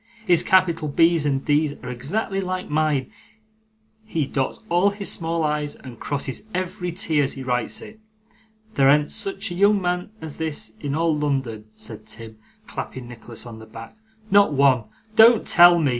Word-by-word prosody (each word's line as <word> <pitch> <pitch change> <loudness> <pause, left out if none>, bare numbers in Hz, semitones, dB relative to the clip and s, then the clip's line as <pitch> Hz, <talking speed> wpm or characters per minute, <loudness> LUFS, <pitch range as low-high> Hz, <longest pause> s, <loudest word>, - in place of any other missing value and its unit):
'His 175 -4 +4
capital 175 -4 +2
B's 165 +1 +3
and 135 -1 -1
D's 150 0 +2
are 125 - -6
exactly 195 - -2
like 185 0 -3
mine; 150 -3 0 0.9
he 165 -9 -2
dots 135 +6 -3
all 175 +2 +3
his 200 0 -2
small 165 0 -2
i's 150 -1 -1
and 125 -3 -12
crosses 140 -2 -3
every 180 -1 -3
t 160 -3 0
as 135 - 0
he 135 - -7
writes 125 -4 -1
it. 220 - -12 0.7
There 135 -7 +4
an't 150 +1 +3
such 200 -1 -3
a - - -3
young 200 +3 +4
man 180 0 -2
as 160 -2 -8
this 150 -9 -2
in 145 -1 -3
all 165 0 +1
London,' 135 -7 -2
said 110 -1 -10
Tim, 110 0 -8 0.3
clapping 130 -2 -7
Nicholas 120 0 -10
on 115 -2 -9
the 110 - -12
back; 115 - -11 0.4
'not 200 -5 +5
one. 135 -4 +3 0.3
Don't 225 0 +7
tell 175 0 +7
me! 155 -4 +2
150 Hz, 175 wpm, -23 LUFS, 130-180 Hz, 0.9 s, Don't